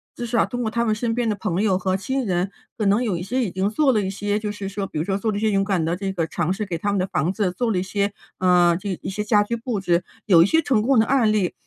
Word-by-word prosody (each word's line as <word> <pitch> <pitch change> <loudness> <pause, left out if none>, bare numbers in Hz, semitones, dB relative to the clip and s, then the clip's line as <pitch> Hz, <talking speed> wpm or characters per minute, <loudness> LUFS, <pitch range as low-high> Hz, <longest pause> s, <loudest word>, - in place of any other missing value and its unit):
至 240 - -5
少 235 0 +1
通 245 -1 -3
过 220 - -2
他 235 0 0
们 215 -2 +1
身 225 +1 -1
边 235 -1 0
的 210 - 0
朋 190 -2 -2
友 195 -4 +2
和 185 0 0
亲 265 +6 -2
人， 185 -1 0 0.3
可 215 -4 -1
能 210 +5 +3
有 215 -7 0
一 170 - -4
些 250 +8 -1
已 205 - -3
经 190 +3 0
做 275 +5 +2
了 215 -4 +2
一 190 - -2
些 205 +1 -2
就 210 -1 -3
是 205 -1 -6
说 195 0 -4
比 - - -7
如 155 - -1
说 195 - -1
做 215 +3 -1
了 205 - -3
一 - - -3
些 220 -1 +2
勇 195 -1 +2
敢 190 -5 0
的 170 +2 0
这 195 +1 -3
个 170 -4 -1
尝 160 +2 -2
试， 210 +3 -2
给 185 -4 -4
他 205 +5 -1
们 200 - 0
的 185 - +1
房 175 -2 -1
子 195 -2 -1
做 230 +4 -1
了 190 - 0
一 180 - 0
些， 200 +1 -1 0.3
呃， 180 -2 +4
这 195 -3 -4
一 - - -3
些 210 +2 -3
家 210 -1 +3
居 235 +3 -3
布 235 -2 -3
置， 175 -2 +1 0.2
有 175 -6 +6
一 170 - +6
些 320 - +3
成 265 -8 +1
功 255 +3 +2
的 220 - +5
案 250 -5 +3
例。 200 -4 0
205 Hz, 350 characters per minute, -22 LUFS, 185-225 Hz, 0.3 s, 有